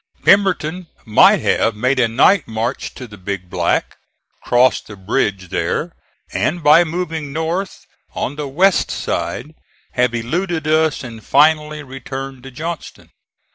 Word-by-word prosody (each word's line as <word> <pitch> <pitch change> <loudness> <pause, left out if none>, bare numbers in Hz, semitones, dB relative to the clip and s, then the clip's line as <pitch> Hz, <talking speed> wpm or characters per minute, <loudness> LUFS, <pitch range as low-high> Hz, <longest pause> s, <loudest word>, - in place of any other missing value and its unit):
Pemberton 185 -3 +3 0.2
might 110 -2 +5
have 115 - +1
made 130 +5 +1
a 120 - +4
night 140 - +3
march 115 +3 -3
to 130 - -8
the 105 -3 -13
Big 95 -1 -5
Black, - - 0 0.4
crossed 125 0 +2
the 105 - -9
bridge 95 -1 -1
there - - -2 0.4
and, 140 - -1
by 150 +4 +7
moving 165 -3 -4
north 165 +6 -3 0.3
on 140 - -3
the 150 -1 -4
west 180 +8 +2
side, 85 - -3 0.4
have 125 -2 +1
eluded 160 +7 -2
us 155 -1 +2
and 115 -3 -9
finally 150 +1 +3
returned 135 0 -7
to 135 - -10
Johnston. 160 +5 -7
135 Hz, 135 wpm, -18 LUFS, 115-160 Hz, 0.4 s, by